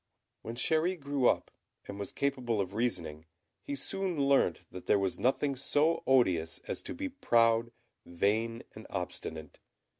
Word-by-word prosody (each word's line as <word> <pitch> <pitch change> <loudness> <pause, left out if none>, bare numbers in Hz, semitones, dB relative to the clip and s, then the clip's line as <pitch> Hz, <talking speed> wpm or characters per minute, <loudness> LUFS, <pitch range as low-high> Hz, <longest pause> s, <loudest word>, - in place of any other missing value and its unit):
When 115 - -6
Chéri 160 +7 +1
grew 140 -3 +1
up, - - 0 0.4
and 100 0 -7
was 100 - -4
capable 125 -5 -1
of 95 -1 -2
reasoning, 85 -9 -2 0.3
he 285 - -4
soon 195 - -2
learnt 140 -11 +2
that 90 - -9
there - - +5
was 95 -1 -1
nothing 135 +4 +1
so 145 +4 +2
odious 95 -12 +3
as - - -3
to - - -6
be 285 +2 -3
proud, 115 - +3 0.3
vain, 110 +6 0
and - - -11
obstinate. 80 -2 -5
120 Hz, 150 wpm, -31 LUFS, 100-145 Hz, 0.4 s, there